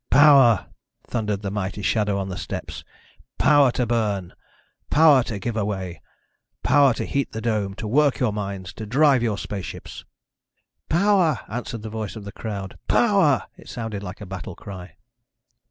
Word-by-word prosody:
"Power!" 135 -6 +6 0.4
thundered 105 -3 -2
the 100 - -3
mighty 100 0 -4
shadow 105 -1 +1
on 95 -1 -3
the 90 - -4
steps. - - -6 0.5
"Power 145 -3 +5
to 125 - 0
burn! 105 -6 -1 0.6
Power 150 -3 +6
to 110 - -4
give 110 +4 -4
away. 95 -5 -3 0.6
Power 140 -2 +4
to - - -3
heat 140 -1 -2
the 110 - -4
dome, 105 -4 -1
to 110 - -6
work 145 +4 +3
your 125 -5 0
mines, 100 -2 -5
to 110 - -6
drive 135 +2 +4
your 110 -4 0
spaceships!" 100 -2 -7 0.9
"Power!" 175 - +3
answered 115 0 -5
the 110 - -5
voice 110 -2 -5
of 110 - -8
the 100 - -7
crowd. 100 -4 -6
"Power!" 195 - +3
It - - -14
sounded 110 -4 -5
like 90 0 -8
a - - -6
battle 90 -3 -7
cry. 90 -4 -10
110 Hz, 160 wpm, -23 LUFS, 100-135 Hz, 0.9 s, Power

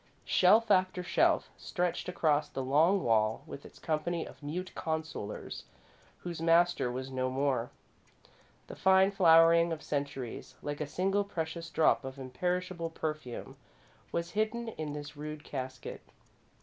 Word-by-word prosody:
Shelf 215 +5 +5
after 185 -1 +3
shelf - - +2
stretched 180 0 -2
across 150 -4 +1
the 135 - -4
long 160 +9 +3
wall, 110 -1 +2
with 140 - -9
its - - -18
company 165 +1 -2
of - - -13
mute 175 +6 -4
consolers 160 -9 -4 0.5
whose 170 -2 -6
master 165 -5 +3
was 130 +2 -5
no 130 0 -1
more. 130 -2 0 1.0
The - - -9
fine 190 +1 +5
flowering 170 -2 +6
of 165 - -1
the - - -15
centuries, 140 -4 -4
like 145 +1 -4
a 150 - -2
single 195 +6 +1
precious 165 -3 -4
drop 120 -7 +3
of 135 +1 -7
imperishable 175 +6 -2
perfume, 155 -6 -5 0.5
was 170 +1 -2
hidden 220 +3 -1
in 155 -8 -5
this 145 -1 -7
rude 150 0 -7
casket. 130 -3 -6
160 Hz, 140 wpm, -31 LUFS, 140-180 Hz, 1.0 s, flowering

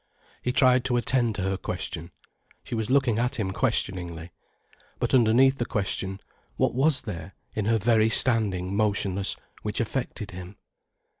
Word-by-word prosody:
He 125 - 0
tried 130 -1 +4
to 125 -1 +2
attend 120 -2 +1
to 95 - -2
her 95 0 0
question. 85 -2 -5 0.5
She - - -8
was 110 -2 -1
looking 130 -4 +3
at 125 +3 0
him 105 -6 -2
questioningly. 90 -8 -2 0.7
But - - -2
underneath 130 +2 +5
the 120 - 0
question, 95 -1 -2 0.4
what - - +2
was 135 +2 +2
there, 95 -5 -7 0.2
in 110 - -2
her 115 +1 +3
very 110 +1 +3
standing 100 -6 +2
motionless, 100 -2 0 0.3
which 105 - -3
affected 115 -2 -3
him? 90 +2 -9
110 Hz, 150 wpm, -26 LUFS, 95-125 Hz, 0.7 s, underneath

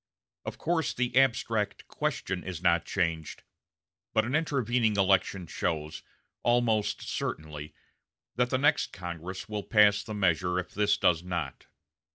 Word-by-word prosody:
Of - - -5
course 165 -1 0
the 125 -1 -1
abstract 115 -5 +1
question 95 -1 -2
is 90 -3 -5
not 85 -1 +2
changed, 85 -4 -2 0.7
but 110 0 +3
an 125 - -3
intervening 125 -8 +1
election 95 -1 +2
shows, 80 -2 -3 0.4
almost 120 -3 +1
certainly, 75 -1 -4 0.6
that 125 +1 +1
the 130 - +1
next 145 +3 +2
Congress 90 +2 -6
will 105 -1 -3
pass 105 -1 +4
the 110 - -6
measure 90 -2 +1
if 90 - -4
this 105 0 +2
does 85 -4 +3
not. 85 -6 -4
100 Hz, 135 wpm, -29 LUFS, 85-115 Hz, 0.7 s, pass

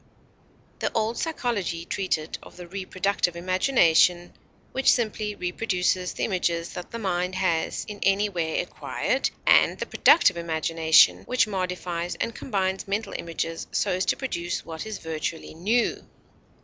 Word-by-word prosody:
The - - -1
old 225 +1 0
psychology 215 - -2
treated 165 -5 -2
of - - -14
the 180 -1 -9
Reproductive 185 -1 -1
Imagination, 180 -2 +3 0.4
which 265 - +4
simply 215 -3 -1
reproduces 180 -1 -1
the - - -4
images 170 -4 -1
that 180 - -7
the 230 - -6
mind 180 -3 -1
has 170 -4 0
in 210 -1 -7
any 195 +2 +3
way 170 -5 -1
acquired, - - -2 0.2
and - - +5
the - - -3
Productive 185 - +5
Imagination 160 -1 +4
which 250 -1 +2
modifies 180 -3 -3
and 230 - -3
combines 190 -4 -2
mental 205 +3 -2
images 165 0 -4
so - - 0
as 185 +1 0
to - - +1
produce 175 -10 -3
what 160 +5 -6
is 215 - -4
virtually 160 0 -5
new. 215 +9 0
185 Hz, 140 wpm, -25 LUFS, 170-210 Hz, 0.4 s, and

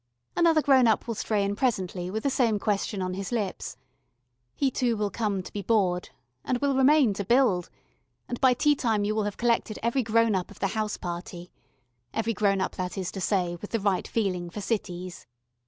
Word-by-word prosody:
Another 325 -3 +4
grown 260 -3 +5
up 220 - +2
will 230 - -1
stray 210 -1 0
in 200 0 -1
presently 190 -7 -1
with 220 +3 -3
the 280 - +2
same 230 -5 +2
question 200 -1 -1
on 185 0 -2
his 195 +3 -5
lips. 205 - -3 0.8
He 275 -2 +1
too 240 -3 0
will 205 -1 -1
come 205 -4 -1
to - - -11
be 205 - -3
bored 190 -4 +1 0.3
and 255 - 0
will 280 +1 +1
remain 265 -3 +5
to 200 - -3
build, 220 -5 +2 0.6
and 245 - -5
by 260 -2 +5
tea 295 +4 +4
time 225 -7 0
you 210 +1 0
will 215 -1 0
have 205 - -4
collected 235 -2 +1
every 235 +3 +1
grown 230 -1 +2
up 185 -2 -1
of 205 - -14
the 195 - 0
house 215 0 -2
party 175 0 -6 0.6
every 225 +1 0
grown 200 -2 +1
up, - - -2
that 185 +1 -3
is 185 -2 -3
to 195 - -6
say, 180 -3 0
with 205 - -7
the 230 - -1
right 195 -2 0
feeling 185 -6 -1
for 190 - -7
cities. 185 - -4
210 Hz, 205 wpm, -27 LUFS, 190-235 Hz, 0.8 s, grown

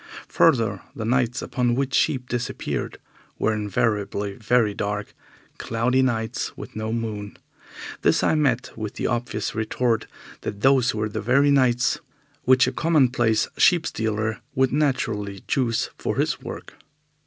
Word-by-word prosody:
Further, 110 -6 +3
the 110 - -4
nights 125 0 +1
upon 120 -1 0
which 135 +1 -1
sheep 125 -3 +1
disappeared 120 0 -3 0.4
were 110 - +1
invariably 105 -1 -1
very 110 0 +2
dark, 105 +1 -3 0.5
cloudy 120 +3 +1
nights 115 -4 -1
with - - -9
no 110 0 -3
moon. 110 -3 -4 0.6
This - - +3
I - - +3
met 135 -6 0
with 110 -2 -5
the - - -3
obvious 120 -3 -2
retort 115 +1 0 0.3
that 100 -1 -5
those 130 -2 +4
were 105 0 -1
the 105 - -4 0.3
nights 125 -3 +3 0.5
which 130 0 +6
a - - -1
commonplace 125 -9 +2
sheep 170 -3 +4
stealer 110 0 -2 0.2
would 130 -1 +2
naturally 115 -9 -1
choose 115 -4 0
for - - -2
his - - 0
work. - - -8
115 Hz, 135 wpm, -24 LUFS, 110-125 Hz, 0.6 s, which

